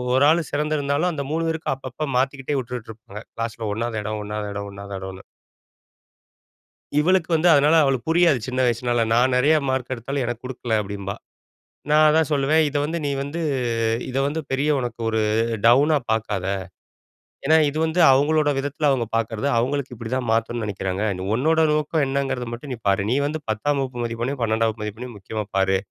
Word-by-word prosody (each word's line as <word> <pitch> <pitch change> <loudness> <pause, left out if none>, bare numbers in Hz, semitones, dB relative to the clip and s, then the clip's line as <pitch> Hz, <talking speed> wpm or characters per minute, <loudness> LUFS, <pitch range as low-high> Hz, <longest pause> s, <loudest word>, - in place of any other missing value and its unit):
1 130 - +4
ஆள் 165 -2 +1
சிறந்திருந்தாலும், 150 +2 0
அந்த 140 -3 -4
3 165 +1 0
பேருக்கும், 160 -4 -2
அப்பப்போ 130 +3 -5
மாத்திக்கிட்டே 135 +1 -1
உட்டுட்டு 125 -2 -7
இருப்பாங்க. 105 -2 -11
க்ளாஸ்ல 115 -1 -4
1வது 115 0 -2
இடம், 105 0 -3
1வது 105 0 -4
இடம், 100 0 -5
1வது 100 0 -8
இடம்னு. 95 0 -8 1.7
இவளுக்கு 180 +3 +3
வந்து, 160 +2 +3
அதனால 145 +2 +5
அவளுக்கு 135 -2 0
புரியாது 165 -5 +4
சின்ன 130 0 -3
வயசுனால. 120 0 +1
"நான் 125 +2 +3
நிறைய 145 +5 +4
மார்க் 130 -1 -2
எடுத்தாலும், 130 +3 -3
எனக்கு 120 0 -5
குடுக்கல" 120 -3 -2
அப்பிடீம்பா. 100 0 -5 0.7
நான் 155 +1 +5
அதான் 155 0 +2
சொல்லுவேன். 145 +2 +3
"இத 145 - -2
வந்து 160 +3 -2
நீ 140 - 0
வந்து, 145 +5 -4 0.7
இத 130 - -3
வந்து 150 +3 -2
பெரிய 135 +3 +1
உனக்கு 120 -2 -5
ஒரு, 110 0 0 0.5
டவுனா 140 +6 +5
பார்க்காத. 105 -4 -1 1.0
ஏன்னா 160 +3 +5
இது 145 - -5
வந்து 160 +2 -1
அவுங்களோட 145 +3 +3
விதத்துல, 145 +2 0
அவுங்க 125 -4 +1
பார்க்குறது. 115 +3 -1
அவுங்களுக்கு 135 +2 -1
இப்படி 115 0 -7
தான் 130 -2 -2
மாத்தணும்னு 115 0 -1
நினைக்கிறாங்க. 95 -1 -3 0.3
உன்னோட 160 +6 +3
நோக்கம் 150 0 0
என்னங்கிறத 135 -2 -2
மட்டும் 125 +4 -7
நீ - - -6
பாரு. 100 0 +2
நீ 130 - +2
வந்து 155 +1 -4
பத்தாம் 140 +7 0
வகுப்பு 125 -2 -4
மதிப்பெண்ணையும், 120 +3 -3
பன்னெண்டாம் 110 0 +2
வகுப்பு 110 0 -9
மதிப்பெண்ணையும், 110 +3 -6
முக்கியமா 105 +3 -4
பாரு. 95 0 +3
130 Hz, 170 wpm, -23 LUFS, 115-145 Hz, 1.7 s, அதனால